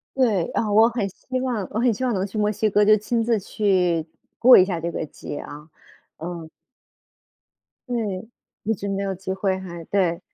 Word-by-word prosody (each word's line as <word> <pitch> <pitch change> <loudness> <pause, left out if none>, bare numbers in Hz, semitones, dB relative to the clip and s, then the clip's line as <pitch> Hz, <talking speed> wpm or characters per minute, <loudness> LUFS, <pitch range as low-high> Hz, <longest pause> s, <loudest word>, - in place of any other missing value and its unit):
对， 220 -10 +2
啊， 215 -2 -1
我 220 +3 +6
很 235 -4 -2
希 255 +7 -5
望， 235 -7 -2
我 215 - -2
很 240 -2 +3
希 260 - -5
望 250 - +1
能 190 -1 0
去 205 +2 -7
墨 210 0 +2
西 215 +1 0
哥 210 +1 +3
就 215 +1 +6
亲 230 +2 -1
自 230 -1 +2
去 180 -5 +1 0.3
过 250 +1 +9
一 185 - +6
下 180 -3 -2
这 170 +1 -3
个 160 - -3
节 145 - -8
啊， 150 +2 -10 0.5
嗯。 165 -1 -7 1.4
对， 220 -5 -3 0.4
一 225 +2 +1
直 200 0 -5
没 195 0 -2
有 195 -1 -2
机 190 +1 -5
会 190 0 0
还 175 -3 -8
对。 180 -4 0
200 Hz, 210 characters per minute, -23 LUFS, 180-220 Hz, 1.4 s, 过